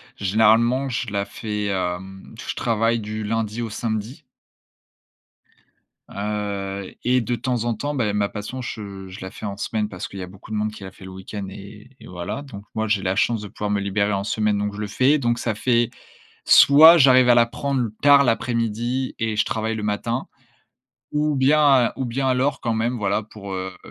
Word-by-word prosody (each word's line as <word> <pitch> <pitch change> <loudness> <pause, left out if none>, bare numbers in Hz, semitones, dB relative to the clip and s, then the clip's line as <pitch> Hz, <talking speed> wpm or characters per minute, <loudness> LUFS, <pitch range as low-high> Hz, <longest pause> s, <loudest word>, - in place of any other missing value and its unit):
généralement, 110 +6 +3
je 120 -3 -3
la 100 -1 -1
fais, 105 -1 -4
hem, 95 0 -4
je - - -5
travaille 115 0 +1
du 110 0 -5
lundi 115 +1 -2
au 115 - -3
samedi 110 +5 -4 1.9
heu, 100 -2 -4
et 125 +1 +3
de 120 0 -1
temps 125 -2 -2
en 120 - +1
temps, 145 +7 -3
beh 115 -7 0
ma 100 -1 0
passion, 110 +5 -6
je 100 -5 -7
je 95 - -10
la 95 - -6
fais 110 - -9
en 100 -1 -4
semaine, 105 0 -2
parce 90 -3 -6
qu'il 100 - -9
y 95 - -4
a - - -7
beaucoup 95 +4 -14
de - - -2
monde 105 0 -1
qui 105 - -11
l'a 95 - -8
fait 95 - -16
le 95 - -9
week-end 95 +2 -7
et 105 +4 -12
et - - -13
voilà. 90 +10 -5
Donc 105 -8 -10
moi, 110 0 -1
j'ai 100 -2 +1
la 95 0 0
chance 115 -1 +1
de 105 - -8
pouvoir 105 - -4
me 100 -1 0
libérer 100 +1 0
en 100 0 -1
semaine, 105 0 0
donc 105 0 -2
je 105 - -8
le 105 - -3
fais. 130 +8 +3
Donc 120 -4 0
ça 115 -1 -1
fait, 120 +2 +1 0.6
soit 160 +4 +8
j'arrive 130 -2 +6
à 120 - +6
la 115 - +5
prendre 130 0 -2
tard 140 -1 +7
l'après-midi, 115 +2 -1
et 110 -1 -1
je 110 - +3
travaille 110 0 -2
le 105 - -4
matin. 115 +4 -2 0.8
Ou 150 0 0
bien 135 -2 +4
ou 130 - -2
bien 130 +2 -1
alors 130 +2 +1
quand 115 -2 -1
même, 115 +3 -1
voilà, 105 -1 0
pour, 100 -2 -9
heu 95 0 -5
110 Hz, 205 wpm, -22 LUFS, 100-120 Hz, 1.9 s, soit